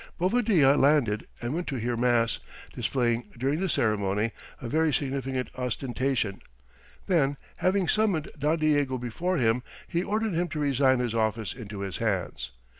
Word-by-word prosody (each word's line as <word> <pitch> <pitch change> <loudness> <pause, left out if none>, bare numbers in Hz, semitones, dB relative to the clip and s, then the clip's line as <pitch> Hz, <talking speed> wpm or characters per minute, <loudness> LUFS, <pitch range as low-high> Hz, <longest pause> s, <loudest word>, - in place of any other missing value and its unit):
Bovadilla 185 - +4
landed 135 -7 +3 0.2
and 120 +3 -1
went 175 +2 -3
to 140 - -2
hear 120 0 -1
mass, 120 -1 +2 0.3
displaying 120 -2 0
during 135 +5 0
the 190 0 0
ceremony 105 -3 +1 0.3
a 120 - -6
very 160 +5 +2
significant 135 -1 -2
ostentation; 125 -3 -1 0.6
then, 145 -6 +2 0.2
having 185 -1 +1
summoned 200 -7 +1
Don 150 +2 +1
Diego 145 -4 +2
before 145 +10 -2
him, 115 -1 +2 0.3
he 170 - 0
ordered 215 +2 -1
him 175 +2 +1
to 155 -1 -4
resign 135 -2 +3
his 120 -2 -1
office 110 -3 0
into 105 -4 -7
his 95 -2 -3
hands. 100 - -2
135 Hz, 150 wpm, -27 LUFS, 115-160 Hz, 0.6 s, Bovadilla